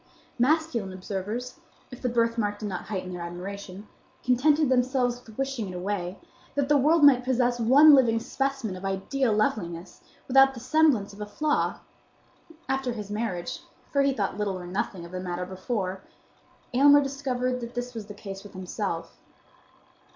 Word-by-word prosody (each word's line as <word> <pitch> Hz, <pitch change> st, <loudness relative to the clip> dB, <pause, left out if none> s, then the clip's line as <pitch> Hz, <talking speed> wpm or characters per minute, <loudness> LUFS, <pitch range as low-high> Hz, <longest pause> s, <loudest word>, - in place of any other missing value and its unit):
Masculine 255 Hz, -7 st, +1 dB
observers, 210 Hz, -, -5 dB, 0.3 s
if 250 Hz, -, -10 dB
the 250 Hz, -, 0 dB
birthmark 230 Hz, -3 st, 0 dB
did 210 Hz, -, -5 dB
not 185 Hz, -3 st, -5 dB
heighten 185 Hz, -3 st, -4 dB
their 175 Hz, -, -6 dB
admiration, 190 Hz, +3 st, -7 dB, 0.4 s
contented 290 Hz, +5 st, +3 dB
themselves 250 Hz, -1 st, +1 dB
with 220 Hz, -2 st, -15 dB
wishing 270 Hz, -6 st, -2 dB
it 180 Hz, -, -7 dB
away, 180 Hz, 0 st, -3 dB, 0.4 s
that 285 Hz, -1 st, +1 dB
the 295 Hz, -, +5 dB
world 300 Hz, +3 st, +4 dB
might 265 Hz, -3 st, +7 dB
possess 245 Hz, -1 st, +1 dB
one 280 Hz, +7 st, +7 dB
living 235 Hz, -5 st, +5 dB
specimen 270 Hz, -4 st, -2 dB
of 185 Hz, -, -9 dB
ideal 205 Hz, +7 st, 0 dB
loveliness 180 Hz, -5 st, -1 dB, 0.3 s
without 270 Hz, +1 st, +5 dB
the -, -, -7 dB
semblance 255 Hz, -6 st, +2 dB
of 205 Hz, -, -11 dB
a 210 Hz, -, -4 dB
flaw. 300 Hz, +8 st, 0 dB, 0.9 s
After 265 Hz, -2 st, -1 dB
his 210 Hz, -3 st, -7 dB
marriage,—for 210 Hz, +6 st, -3 dB
he 275 Hz, 0 st, +3 dB
thought 210 Hz, -5 st, -2 dB
little 200 Hz, -3 st, -1 dB
or 180 Hz, -, -8 dB
nothing 180 Hz, -1 st, -3 dB
of 170 Hz, -, -12 dB
the 185 Hz, -, -4 dB
matter 180 Hz, 0 st, -3 dB
before,—Aylmer 200 Hz, +8 st, 0 dB
discovered 255 Hz, -2 st, -2 dB
that 235 Hz, 0 st, -7 dB
this 245 Hz, 0 st, -4 dB
was 220 Hz, -3 st, -7 dB
the 205 Hz, -, -9 dB
case 195 Hz, -1 st, -8 dB
with 205 Hz, 0 st, -13 dB
himself. 185 Hz, -2 st, -4 dB
230 Hz, 160 wpm, -27 LUFS, 195-265 Hz, 0.9 s, might